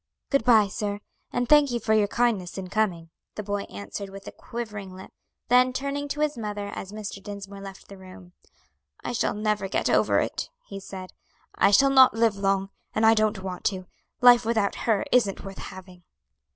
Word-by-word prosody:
"Good 275 -4 +3
bye, 220 -3 +5
sir; 205 +1 -3 0.3
and 245 0 -1
thank 295 0 +6
you 240 -1 -1
for 220 - 0
your 215 -1 +3
kindness 210 -6 0
in 185 -1 -6
coming," 180 -6 -1 0.2
the 210 - -5
boy 205 0 -3
answered 100 - -7
with 195 0 -11
a - - -7
quivering 210 -5 -7
lip. 190 - -11 0.4
Then, 250 +2 +5
turning 280 +2 -3
to 295 +1 -4
his 300 -1 +1
mother, 205 -2 -4
as 195 - -7
Mr. 210 -2 -7
Dinsmore 200 0 -8
left 195 -1 -10
the 200 -1 -12
room, 185 -1 -13 0.7
"I - - -3
shall 235 - 0
never 210 -2 -1
get - - 0
over - - +3
it," - - -3 0.2
he 195 - -8
said. 190 -1 -9 0.4
"I - - +4
shall 275 +7 +5
not 260 -3 +7
live 225 -2 +2
long, 195 0 0 0.2
and 220 - +2
I 225 - +7
don't 215 -3 0
want 185 -2 -6
to; 185 -2 -1 0.4
life 245 -1 +7
without 220 -3 +1 0.2
her 215 -3 +2
isn't 220 -6 +2
worth 195 0 -8
having." 185 -1 -10
205 Hz, 190 wpm, -26 LUFS, 195-235 Hz, 0.7 s, not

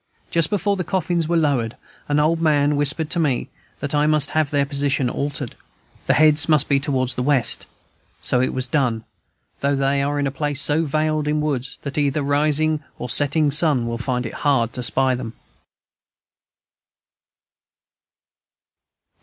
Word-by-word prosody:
Just 165 -2 +2
before 200 0 0
the 180 - -2
coffins 175 -2 -1
were 170 +1 +1
lowered, 135 -7 0 0.3
an 145 0 +1
old 165 +2 +1
man 150 -2 +2
whispered 145 +2 +1
to 175 - +2
me 145 -6 0 0.3
that 145 0 -3
I 150 0 +2
must 155 -2 +3
have 155 -2 +1
their 145 -1 +1
position 140 -3 0
altered, 140 -3 -4 0.5
the - - +3
heads 155 0 +4
must 150 -2 +3
be 140 -1 +2
towards 130 -3 -1
the 125 - -3
west; 135 -2 +1 0.5
so 125 - +2
it 130 - 0
was 130 -1 -2
done, 125 -4 0 0.6
though 140 0 +1
they 140 0 +1
are 145 +1 -1
in 145 - 0
a 135 - -1
place 145 0 -1
so 150 +2 +3
veiled 155 0 -1
in 150 0 0
woods 140 -4 -2
that 140 +1 -3
either 145 +1 0
rising 150 +2 +1
or 125 - -4
setting 145 +1 +2
sun 150 -5 +2
will 115 0 -4
find 125 0 -2
it 115 - -6
hard 125 -5 +1
to 125 - -4
spy 130 +2 +1
them. 120 -3 -5
145 Hz, 165 wpm, -21 LUFS, 135-155 Hz, 0.6 s, heads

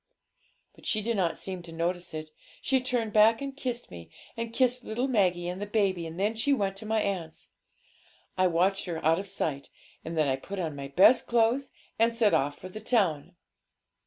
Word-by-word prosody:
But - - -12
she 215 -1 +1
did 230 +1 0
not 180 -4 0
seem 185 -2 -5
to 170 -1 -12
notice 175 +1 -3
it; 155 0 -6 0.3
she 265 -1 +1
turned 245 -4 -1
back 220 +1 +5
and 275 -1 -5
kissed 250 -3 -4
me, 85 -2 -10 0.3
and 230 0 -4
kissed 250 +1 +2
little 240 +5 -2
Maggie 180 -8 +1
and 180 +2 -4
the 205 - -3
baby, 195 -5 0
and 165 +2 -8
then 205 +3 +1
she 225 +6 +1
went 195 -6 0
to 215 - -8
my 220 0 +1
aunt's. 180 -6 -4 0.9
I 185 0 +3
watched 185 +3 +1
her 165 -4 -5
out 165 +2 +4
of 200 - -6
sight, 150 -7 -3 0.3
and 165 0 -5
then 155 -2 +3
I 135 -1 +1
put 195 +9 -8
on 160 -5 -3
my 140 -1 -6
best 190 - +5
clothes 235 +3 +2 0.3
and 230 +1 +3
set 225 -3 +3
off 145 +1 +1
for - - -9
the 185 +4 -8
town.' 180 - 0
195 Hz, 205 wpm, -28 LUFS, 170-230 Hz, 0.9 s, back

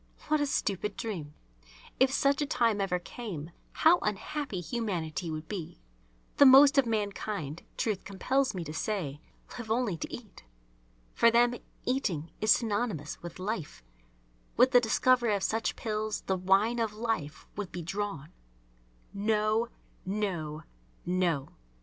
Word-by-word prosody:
What 305 -1 +3
a 290 - +1
stupid 210 -5 -1
dream! 165 -10 -5 0.6
If 260 0 +5
such 275 +1 +2
a 290 - 0
time 230 -7 +2
ever 190 -2 +1
came, 175 -4 -7 0.2
how 340 +2 +5
unhappy 210 +2 -3
humanity 175 - -3
would 155 0 -5
be! 175 - -6 0.6
The 285 - +8
most 275 +2 +8
of 260 - +3
mankind, 200 -7 -2 0.2
truth 210 -4 -1
compels 255 +6 0
me 180 - -3
to 155 - -7
say, 160 -6 -3 0.4
live 230 -2 -7
only 225 -6 +1
to - - -6
eat. 215 - -10 0.7
For 235 - +5
them 240 +1 +4 0.3
"eating" 180 - -1
is 215 - 0
synonymous 205 - +1
with 170 -1 -8
"life." 185 - -4 0.7
With 255 +2 +6
the 245 -2 +7
discovery 240 -1 +3
of 195 - -2
such 225 +2 0
pills 215 -1 -2
the 190 - -1
wine 195 +6 +2
of 225 -2 0
life 215 -10 -3
would 205 -3 -5
be 175 - -5
drawn. 165 -4 -4 0.8
No! 215 +2 +1 0.3
No! 175 -6 -3 0.4
No! 175 -6 0
210 Hz, 140 wpm, -30 LUFS, 175-235 Hz, 0.8 s, The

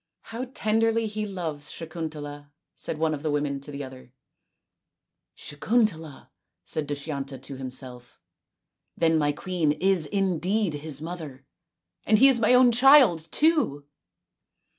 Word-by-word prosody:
" - - -61
How 245 +3 -3
tenderly 225 +1 +1
he 215 0 -3
loves 165 -7 -5
Sakuntala! 155 -3 -7
" - - -60
said - - -5
one 160 0 0
of 145 - -5
the 155 - -2
women 145 -1 -1
to 140 - -7
the 140 0 -6
other. 130 -1 -12 0.6
" - - -56
Sakuntala! 165 - -2 0.2
" - - -58
said 155 -2 -3
Dushyanta 140 -2 -5
to 135 +1 -7
himself. 130 -1 -7 0.4
" - - -60 0.3
Then 165 -1 +3
my 145 -1 +2
queen 165 -1 -1
is 185 -2 +1
indeed 195 0 0
his 150 0 -5
mother, 155 -6 -8 0.6
and 215 - +3
he 270 - +7
is 260 -3 +4
my 230 +3 +4
own 250 -1 +6
child 240 - +5
too 290 - +2
160 Hz, 150 wpm, -26 LUFS, 145-210 Hz, 0.6 s, he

